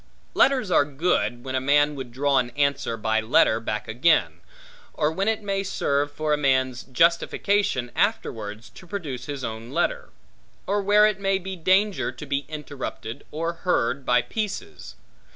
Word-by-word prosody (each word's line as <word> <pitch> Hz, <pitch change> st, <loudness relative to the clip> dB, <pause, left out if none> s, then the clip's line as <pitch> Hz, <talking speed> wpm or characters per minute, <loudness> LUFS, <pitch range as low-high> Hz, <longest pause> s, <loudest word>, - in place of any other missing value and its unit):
Letters 255 Hz, -8 st, +3 dB
are -, -, +5 dB
good, 140 Hz, -4 st, -1 dB
when 130 Hz, -, -5 dB
a 130 Hz, -, 0 dB
man 145 Hz, +2 st, +3 dB
would 130 Hz, -4 st, -7 dB
draw 140 Hz, +2 st, +2 dB
an 120 Hz, -1 st, -1 dB
answer 140 Hz, -5 st, 0 dB
by 110 Hz, 0 st, 0 dB
letter 110 Hz, 0 st, +3 dB
back 105 Hz, -2 st, -4 dB
again; 120 Hz, -, +2 dB, 0.6 s
or 150 Hz, +1 st, +1 dB
when 195 Hz, +5 st, -2 dB
it 220 Hz, -1 st, 0 dB
may 195 Hz, -1 st, -1 dB
serve 145 Hz, -7 st, -1 dB
for 155 Hz, +1 st, -1 dB
a -, -, +2 dB
man's 130 Hz, -3 st, +1 dB
justification 170 Hz, 0 st, +1 dB
afterwards 115 Hz, -, -2 dB
to 150 Hz, +9 st, -14 dB
produce 145 Hz, -11 st, -5 dB
his 140 Hz, -3 st, -5 dB
own 110 Hz, 0 st, -5 dB
letter; -, -, -1 dB, 0.6 s
or 205 Hz, +1 st, 0 dB
where 205 Hz, +2 st, +5 dB
it 210 Hz, -2 st, +1 dB
may 195 Hz, -1 st, +1 dB
be 190 Hz, 0 st, -6 dB
danger 190 Hz, +4 st, +2 dB
to 150 Hz, -, -9 dB
be 140 Hz, 0 st, -2 dB
interrupted, 145 Hz, -6 st, -7 dB
or 165 Hz, +3 st, -3 dB
heard 140 Hz, -7 st, 0 dB
by 125 Hz, -1 st, +3 dB
pieces. 210 Hz, -, -5 dB
145 Hz, 165 wpm, -24 LUFS, 125-190 Hz, 0.6 s, are